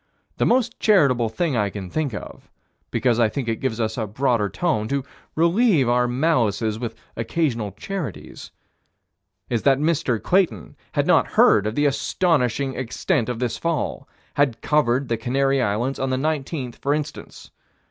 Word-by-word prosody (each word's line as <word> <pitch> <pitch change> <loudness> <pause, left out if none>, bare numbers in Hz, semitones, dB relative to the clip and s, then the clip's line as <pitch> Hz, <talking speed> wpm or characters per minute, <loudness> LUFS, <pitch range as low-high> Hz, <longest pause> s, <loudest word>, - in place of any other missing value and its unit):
The - - +2
most 245 -1 +1
charitable 140 - +3
thing 150 +5 -1
I 105 -3 +1
can 95 -1 -7
think 155 -4 -1
of - - -9 0.4
because 120 -2 +1
I 115 -2 +4
think 130 +1 -4
it 115 -1 -1
gives 120 -4 -2
us 110 0 -1
a 110 - -2
broader 115 -1 0
tone 110 - -1
to 140 +2 -1 0.3
relieve 170 - +3
our 125 0 +2
malices 120 -6 +1
with 115 -2 -4 0.2
occasional 115 - -1
charities 160 - -6 1.0
is 120 -3 -1
that 135 -2 +4
Mr. 145 -6 0
Clayton 170 - 0 0.2
had - - +1
not - - +4
heard 105 0 +5
of 110 - -3
the 145 - +2
astonishing 140 -3 +1
extent 130 +2 -1
of 125 - -2
this 120 -1 -2
fall 160 -4 -2 0.2
had 140 -5 +1
covered 140 -3 +2
the 115 - -1
Canary 135 +3 +1
Islands, 120 +5 -1
on 135 - -1
the 130 - 0
19th, 140 -3 -3
for 140 +1 0
instance. 150 -1 -7
130 Hz, 160 wpm, -22 LUFS, 115-150 Hz, 1.0 s, heard